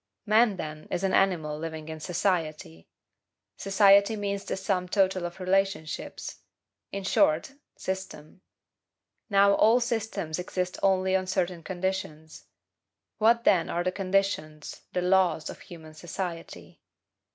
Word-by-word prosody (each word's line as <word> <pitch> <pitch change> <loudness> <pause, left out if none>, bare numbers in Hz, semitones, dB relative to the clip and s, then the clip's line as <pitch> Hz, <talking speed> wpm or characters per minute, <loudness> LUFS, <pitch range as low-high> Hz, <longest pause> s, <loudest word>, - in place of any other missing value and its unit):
Man, 215 -1 +4
then, 155 -1 -7
is 175 - -2
an 190 - +1
animal 160 -6 +1
living 160 -1 -6
in 160 0 -7
society. 155 - -2 0.7
Society 200 +2 +4
means 200 -1 -3
the - - -4
sum 185 -2 -1
total 190 -2 +1
of 175 +2 -12
relationships; 190 -4 -2 0.5
in 200 0 -4
short, 165 +2 +2 0.2
system. 190 -3 -6 0.9
Now, 200 0 +5
all 225 +4 +5
systems 220 -9 -2
exist 180 0 -3
only 190 -1 +2
on 185 -1 0
certain 180 -2 -1
conditions. 175 -3 -5 0.7
What, 230 +2 +4
then, 180 -7 +3
are 175 - -1
the 185 - 0
conditions, 185 -6 -2
the 180 - -1
LAWS, 180 -4 +2
of - - -12
human 160 -3 -12
society? 170 +1 -7
185 Hz, 125 wpm, -27 LUFS, 165-195 Hz, 0.9 s, Now